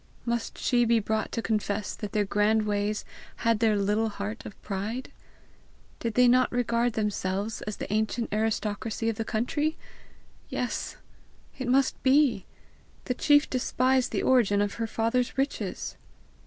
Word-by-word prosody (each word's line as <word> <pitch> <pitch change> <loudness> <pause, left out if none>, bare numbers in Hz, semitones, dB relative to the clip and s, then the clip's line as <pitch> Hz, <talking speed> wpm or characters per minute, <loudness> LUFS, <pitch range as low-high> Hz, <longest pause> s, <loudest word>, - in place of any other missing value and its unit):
Must 235 -1 -2
she 245 -2 +2
be 235 0 +4
brought 220 0 -1
to 230 - -2
confess 210 -2 -1
that 210 -2 -6
their 210 -1 +1
grand 210 +2 +2
ways 205 0 -1 0.4
had 230 -2 +3
their 220 -2 +3
little 210 +3 +1
heart 205 +2 -5
of 205 - -12
pride? 210 +6 -4 0.9
Did 230 -2 -3
they 250 0 +6
not 255 +1 +4
regard 240 -1 +1
themselves 210 0 -2
as 210 - -4
the - - -4
ancient 220 +1 -1
aristocracy 220 +1 -1
of 225 - -3
the 225 - -1
country! 295 +9 -1 0.7
Yes, - - -3 0.6
it 260 - -3
must 260 +1 +2
be! 260 -7 +3 0.6
The 250 - 0
chief 290 +3 +4
despised 255 0 +1
the - - -1
origin 230 -6 +4
of 205 0 0
her 225 - 0
father's 230 +4 0
riches! 270 +1 -2
225 Hz, 150 wpm, -27 LUFS, 210-245 Hz, 0.9 s, they